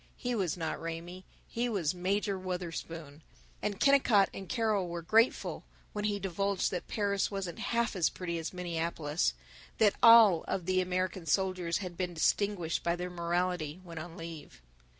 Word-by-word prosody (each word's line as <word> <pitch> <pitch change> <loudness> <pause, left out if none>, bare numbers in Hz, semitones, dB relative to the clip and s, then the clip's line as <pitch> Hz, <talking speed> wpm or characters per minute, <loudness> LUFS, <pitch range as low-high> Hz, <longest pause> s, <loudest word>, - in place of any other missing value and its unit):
He 245 0 -2
was 185 -7 -1
not 160 -2 -3
Raymie; 170 +3 -6 0.2
he 240 +1 -1
was 185 -8 0
Major 195 +3 0
Wutherspoon; 165 -4 -5 0.4
and 205 -2 -2
Kennicott 250 -8 +5
and 190 -2 -8
Carol 215 -6 +1
were 170 0 -5
grateful 225 +8 +2 0.3
when 210 0 -2
he 205 -1 +1
divulged 195 0 -1
that 180 -2 -4
Paris 200 -2 0
wasn't 195 -4 -4
half 235 -2 0
as 175 -4 +2
pretty 170 -2 -4
as 160 - -4
Minneapolis, 170 -3 -1 0.4
that 210 -2 +5
all 225 -7 +8
of 180 - -2
the 185 0 +2
American 185 -1 -2
soldiers 185 0 +1
had 175 -2 -7
been 180 -2 -2
distinguished 180 0 +1
by 170 0 0
their 180 +1 -5
morality 175 -2 -1
when 170 -3 -8
on 165 +1 -8
leave. 165 - -9
180 Hz, 160 wpm, -31 LUFS, 170-200 Hz, 0.4 s, all